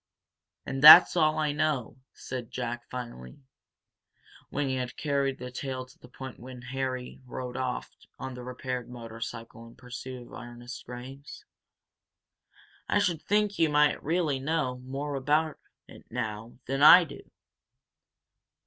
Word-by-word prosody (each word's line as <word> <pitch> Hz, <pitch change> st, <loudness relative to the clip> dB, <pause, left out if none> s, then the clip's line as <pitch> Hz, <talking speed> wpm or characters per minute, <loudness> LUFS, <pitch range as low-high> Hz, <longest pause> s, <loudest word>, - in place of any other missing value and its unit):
"And 135 Hz, 0 st, -4 dB
that's 155 Hz, +5 st, +11 dB
all 155 Hz, -3 st, +3 dB
I 150 Hz, -1 st, +1 dB
know," 145 Hz, -6 st, -1 dB
said 125 Hz, -3 st, -7 dB
Jack, 120 Hz, -1 st, -5 dB
finally, 120 Hz, -, -8 dB, 1.1 s
when 145 Hz, 0 st, -1 dB
he 130 Hz, -, -1 dB
had 125 Hz, -1 st, -4 dB
carried 140 Hz, -2 st, 0 dB
the 125 Hz, 0 st, -7 dB
tale 130 Hz, 0 st, -5 dB
to 130 Hz, -, -21 dB
the -, -, -14 dB
point 130 Hz, 0 st, -9 dB
where 125 Hz, +1 st, -10 dB
Harry 130 Hz, 0 st, -4 dB
rode 125 Hz, 0 st, -6 dB
off 130 Hz, -1 st, -3 dB, 0.2 s
on 130 Hz, 0 st, -6 dB
the 125 Hz, -, -8 dB
repaired 125 Hz, 0 st, -5 dB
motorcycle 115 Hz, -1 st, -8 dB
in 115 Hz, -, -16 dB
pursuit 125 Hz, 0 st, -8 dB
of -, -, -16 dB
Ernest 120 Hz, 0 st, -9 dB
Graves. 130 Hz, +3 st, -10 dB, 1.4 s
"I -, -, +3 dB
should 180 Hz, -6 st, +1 dB
think 210 Hz, 0 st, +1 dB
you 165 Hz, -2 st, +4 dB
might 150 Hz, 0 st, +3 dB
really 155 Hz, -3 st, 0 dB
know 135 Hz, -3 st, -1 dB
more 135 Hz, +3 st, -5 dB
about 150 Hz, +3 st, 0 dB, 0.3 s
it -, -, -14 dB
now 110 Hz, -1 st, -5 dB
than 135 Hz, +2 st, -2 dB
I 175 Hz, +4 st, +10 dB
do." 145 Hz, -4 st, -11 dB
130 Hz, 140 wpm, -28 LUFS, 125-145 Hz, 1.4 s, that's